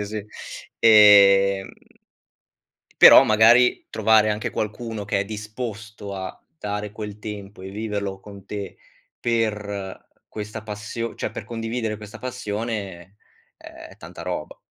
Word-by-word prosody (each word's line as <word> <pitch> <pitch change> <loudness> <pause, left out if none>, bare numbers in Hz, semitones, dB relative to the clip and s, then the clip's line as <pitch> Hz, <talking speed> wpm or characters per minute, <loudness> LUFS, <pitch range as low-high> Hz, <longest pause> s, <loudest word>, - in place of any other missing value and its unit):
facile - - -3
sì. 105 0 -6 0.6
Ehm 100 -3 +6 1.3
però - - +10
magari 115 +3 +4
trovare 110 0 +3
anche 105 0 -2
qualcuno 110 -1 -5
che 100 - 0
è 100 - -2
disposto 110 -1 -7
a 95 -1 -7 0.2
dare 105 -2 -4
quel 105 -1 -7
tempo 100 -2 -9
e 95 - -8
viverlo 100 -2 -4
con 100 -1 -13
te 100 -1 -7 0.4
per 105 -4 -3 0.2
questa 105 +1 -7
passio 110 +2 -6
cioè, - - -4
per - - -7
condividere 115 0 -4
questa 105 +2 -11
passione, 105 -5 -5 0.4
è - - -13
tanta 85 +1 -12
roba. 85 -3 -5
105 Hz, 120 wpm, -23 LUFS, 100-110 Hz, 1.3 s, però